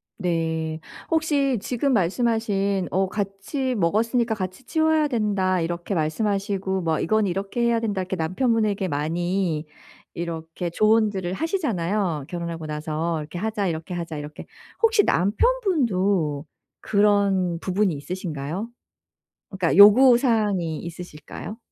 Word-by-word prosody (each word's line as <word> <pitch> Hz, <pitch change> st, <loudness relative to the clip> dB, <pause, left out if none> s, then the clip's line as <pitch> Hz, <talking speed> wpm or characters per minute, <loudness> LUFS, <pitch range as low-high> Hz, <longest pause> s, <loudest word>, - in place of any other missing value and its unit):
네. 160 Hz, -3 st, -2 dB, 0.3 s
혹시 285 Hz, -6 st, +1 dB
지금 260 Hz, +4 st, 0 dB
말씀하신 200 Hz, -1 st, +1 dB
어 190 Hz, +1 st, +1 dB
"같이 205 Hz, +7 st, -3 dB
먹었으니까 225 Hz, +5 st, +1 dB
같이 185 Hz, +3 st, -5 dB
치워야 315 Hz, +1 st, +2 dB
된다." 200 Hz, -7 st, 0 dB
이렇게 170 Hz, +3 st, -3 dB
말씀하시고 195 Hz, +3 st, -1 dB
뭐 160 Hz, -2 st, 0 dB
"이건 215 Hz, +3 st, +1 dB
이렇게 195 Hz, +5 st, -3 dB
해야 235 Hz, -1 st, +2 dB
된다." 205 Hz, -4 st, -1 dB
이렇게 185 Hz, +1 st, -3 dB
남편분에게 205 Hz, +3 st, 0 dB
많이 170 Hz, +2 st, -1 dB, 0.5 s
이렇게 170 Hz, 0 st, -5 dB
조언들을 210 Hz, -3 st, +2 dB
하시잖아요 200 Hz, -, -1 dB
결혼하고 170 Hz, -2 st, -5 dB
나서 155 Hz, +2 st, -2 dB
"이렇게 155 Hz, +3 st, -7 dB
하자, 210 Hz, +1 st, -1 dB
이렇게 165 Hz, +1 st, -4 dB
하자." 170 Hz, -3 st, -4 dB
이렇게. 150 Hz, +1 st, -8 dB, 0.4 s
혹시 450 Hz, -2 st, +4 dB
남편분도 200 Hz, -, +1 dB, 0.4 s
그런 200 Hz, -4 st, +2 dB
부분이 190 Hz, 0 st, 0 dB
있으신가요? 165 Hz, +4 st, -5 dB, 0.8 s
그러니까 185 Hz, -3 st, 0 dB
요구사항이 210 Hz, -, +5 dB
있으실까요? 175 Hz, +4 st, -8 dB
195 Hz, 310 characters per minute, -24 LUFS, 170-220 Hz, 0.8 s, 요구사항이